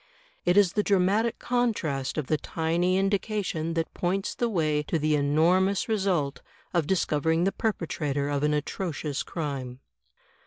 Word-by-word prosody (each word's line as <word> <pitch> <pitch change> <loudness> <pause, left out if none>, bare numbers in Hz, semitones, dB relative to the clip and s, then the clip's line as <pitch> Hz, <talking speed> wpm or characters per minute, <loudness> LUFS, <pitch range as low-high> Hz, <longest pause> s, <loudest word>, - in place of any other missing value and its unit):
It 175 +2 +3
is 195 -4 +5
the 210 - +2
dramatic 205 +4 +2
contrast 190 - -1
of 155 - -1
the 155 - +1
tiny 170 +4 0
indication 195 -4 -1
that 165 -1 -2
points 190 +2 -1
the 240 - -1
way 155 -7 +1
to 165 - +1
the 155 0 +1
enormous 170 +7 +2
result 190 -10 0 0.3
of 170 -4 +1
discovering 160 -2 +1
the 195 - +2
perpetrator 150 -10 -2
of 145 -1 -1
an 150 0 +2
atrocious 150 -1 -3
crime. 135 -6 -5
165 Hz, 145 wpm, -27 LUFS, 150-195 Hz, 0.3 s, is